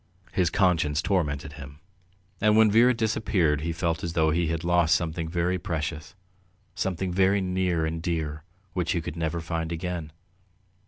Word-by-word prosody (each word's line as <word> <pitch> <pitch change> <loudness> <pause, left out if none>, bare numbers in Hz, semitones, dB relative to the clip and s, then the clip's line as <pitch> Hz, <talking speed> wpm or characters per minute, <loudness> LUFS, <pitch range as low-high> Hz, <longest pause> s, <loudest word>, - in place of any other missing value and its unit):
His 90 -2 +2
conscience 85 -7 +2
tormented 75 -6 -1
him, 70 -2 -10 0.6
and 105 0 +4
when 110 -1 +6
Vera 120 +4 +6
disappeared 110 - +1
he 85 +2 -2
felt 85 -2 -2
as 85 -1 -3
though 80 -2 +3
he 85 +1 +1
had 80 +1 -2
lost 85 -2 +3
something 80 -1 -2
very 90 +2 0
precious, 80 0 -4 0.6
something 95 -1 -2
very 95 +2 +3
near 90 -3 0
and 80 +1 -3
dear 80 -3 -3 0.3
which 90 -4 0
he 85 - -1
could 80 - -6
never 85 0 -2
find 80 0 -3
again. 85 -2 -4
85 Hz, 160 wpm, -26 LUFS, 80-90 Hz, 0.6 s, when